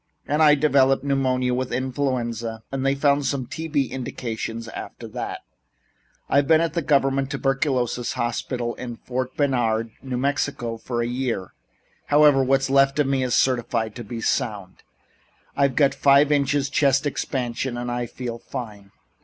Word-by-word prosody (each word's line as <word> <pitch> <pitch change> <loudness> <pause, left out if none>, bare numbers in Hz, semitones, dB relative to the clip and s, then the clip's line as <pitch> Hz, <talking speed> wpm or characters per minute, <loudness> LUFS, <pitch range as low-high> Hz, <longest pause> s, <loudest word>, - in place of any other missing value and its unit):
And 150 +2 +1
I 150 -1 +7
developed 135 -2 +3
pneumonia 130 -2 +1
with 130 0 -2
influenza 120 -4 -2
and 135 -1 -2
they 135 0 +2
found 140 0 +2
some 135 -3 -1
T.B. 155 0 -1
indications 115 -3 -5
after - - -8
that. - - -5 0.9
I've 140 0 +2
been 160 0 +6
at 165 0 0
the 170 - 0
government 135 -2 +2
tuberculosis 130 -3 0
hospital 120 0 -2
at 120 -2 -6
Fort 130 0 -3
Bayard, 115 -5 +1
New 130 -2 -4
Mexico, 135 -3 -1
for 120 +1 -3
a - - -1
year. 120 -6 -3 0.5
However, 145 -2 +5
what's 135 0 +1
left 135 0 +4
of 150 - +3
me 135 -1 +1
is 125 -2 +1
certified 120 -3 +1
to 120 - -6
be 115 +2 -6
sound. 100 -7 -2 0.8
I've 140 -2 +2
got 140 -2 +4
five 140 +1 +4
inches 140 -1 +1
chest 140 0 +3
expansion 125 -3 -2
and 120 0 -3
I 120 0 -2
feel 120 -1 -6
fine." 105 -6 -8
130 Hz, 155 wpm, -23 LUFS, 120-140 Hz, 0.9 s, I